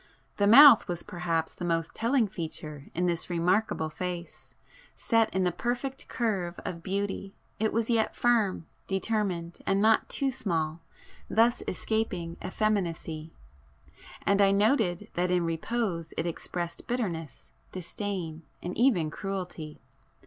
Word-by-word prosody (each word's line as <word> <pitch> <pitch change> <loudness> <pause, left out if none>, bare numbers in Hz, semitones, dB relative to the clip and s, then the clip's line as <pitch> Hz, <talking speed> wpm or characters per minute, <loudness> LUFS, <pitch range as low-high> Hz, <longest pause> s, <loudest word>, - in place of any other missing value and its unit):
The 200 - +3
mouth 265 +2 +9
was 175 -1 -3
perhaps 165 -2 -2
the - - -8
most 165 -1 0
telling 235 0 +2
feature 155 -5 -7
in 180 +2 +1
this 170 0 -1
remarkable 175 -1 +1
face,—set 185 - -3
in 190 - +1
the 180 - +2
perfect 245 +7 -3
curve 190 -7 -2
of 170 -2 -4
beauty, 195 +1 -3 0.2
it 220 0 +1
was 230 0 0
yet 230 -2 +1
firm, 225 -8 +2 0.2
determined, 190 -4 -1
and 195 0 +3
not 220 +1 +4
too 275 -1 0
small, 165 -8 -2 0.5
thus 230 +2 +3
escaping 185 -5 -2
effeminacy,—and 165 - -3
I 200 - +6
noted 200 -2 +2
that 180 +1 0
in 180 -1 +2
repose 170 +1 -2
it 160 - 0
expressed 170 0 -4
bitterness, 180 - -3 0.2
disdain 180 -3 -4 0.2
and 180 - -5
even 200 - +3
cruelty. 180 -6 -5
185 Hz, 125 wpm, -28 LUFS, 170-220 Hz, 0.5 s, mouth